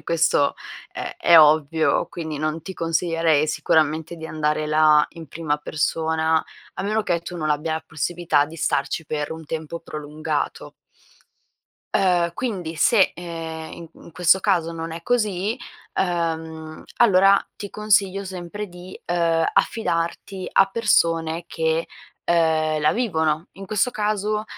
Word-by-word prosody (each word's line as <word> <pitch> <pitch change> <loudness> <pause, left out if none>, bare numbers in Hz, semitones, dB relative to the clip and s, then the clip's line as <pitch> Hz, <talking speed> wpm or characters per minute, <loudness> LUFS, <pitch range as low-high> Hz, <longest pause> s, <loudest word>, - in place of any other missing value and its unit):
e - - -22
questo 165 -4 +2 0.4
è - - -6
è 170 - +6
ovvio, 155 +1 +3
quindi 160 -3 -5
non 155 +1 -2
ti 190 - -7
consiglierei 165 -2 +1
sicuramente 160 +1 +1
di 160 -1 -9
andare 150 -1 -1
là 155 -1 +5
in 165 -2 -11
prima 150 0 -2
persona, 160 +1 0 0.3
a - - -4
meno 215 +1 0
che 175 -4 0
tu 175 +1 -7
non 155 -2 -2
abbia 150 +2 0
la 160 - -3
possibilità 155 -1 0
di 160 - -11
starci 150 0 -1
per 150 0 -3
un 160 0 -9
tempo 160 +2 -5
prolungato 150 -1 -4 1.2
uhm, 175 -3 +2
quindi 180 -10 -4
se, 200 +5 +4
ehm, 165 -2 -7
i 165 -1 -10
in 170 - -15
questo 180 +2 +4
caso 180 -5 +1
non 165 -1 -5
è 165 +1 -7
così, 215 -1 0 0.4
uhm, 160 -3 -3
allora 195 -3 +5
ti 205 - -6
consiglio 200 -2 +1
sempre 190 +2 -6
di, 180 +1 -11
uhm, 165 -2 +1
affidarti 185 -2 -1
a 195 - +5
persone 170 -6 +1
che, 160 0 -1 0.4
uhm, 160 -2 +2
la 150 - +3
vivono, 160 -8 0
in 195 0 -10
questo 215 +4 +1
caso, 210 0 -1
165 Hz, 140 wpm, -23 LUFS, 160-185 Hz, 1.2 s, è